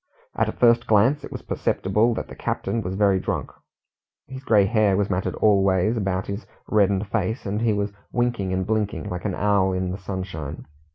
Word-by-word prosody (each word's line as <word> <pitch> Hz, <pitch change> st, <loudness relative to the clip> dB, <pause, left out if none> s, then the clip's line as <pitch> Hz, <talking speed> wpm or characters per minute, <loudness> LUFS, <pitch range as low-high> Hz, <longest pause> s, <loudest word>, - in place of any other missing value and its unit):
At -, -, +1 dB
a -, -, -1 dB
first 120 Hz, 0 st, +3 dB
glance 115 Hz, +8 st, +3 dB
it -, -, -8 dB
was -, -, -7 dB
perceptible 105 Hz, +5 st, +1 dB
that -, -, -4 dB
the -, -, -10 dB
captain 115 Hz, -, -2 dB
was 95 Hz, -1 st, -4 dB
very 100 Hz, -2 st, +3 dB
drunk. -, -, -3 dB, 0.7 s
His 130 Hz, +1 st, -9 dB
grey 105 Hz, -6 st, +4 dB
hair 105 Hz, -2 st, +2 dB
was 100 Hz, 0 st, 0 dB
matted 90 Hz, 0 st, -1 dB
all 100 Hz, -3 st, +3 dB
ways 95 Hz, +3 st, +2 dB
about 95 Hz, -4 st, -1 dB
his 100 Hz, +4 st, -6 dB, 0.2 s
reddened 100 Hz, -1 st, +2 dB
face, 110 Hz, +3 st, -2 dB
and 105 Hz, +2 st, -2 dB
he 115 Hz, -1 st, +2 dB
was 100 Hz, 0 st, -2 dB, 0.2 s
winking 120 Hz, -6 st, 0 dB
and 95 Hz, 0 st, -1 dB
blinking 110 Hz, -3 st, -2 dB
like 90 Hz, +1 st, -5 dB
an 95 Hz, -3 st, -1 dB
owl 100 Hz, -2 st, +2 dB
in 90 Hz, 0 st, -1 dB
the 95 Hz, -, -5 dB
sunshine. 90 Hz, -6 st, -6 dB
100 Hz, 195 wpm, -23 LUFS, 95-110 Hz, 0.7 s, grey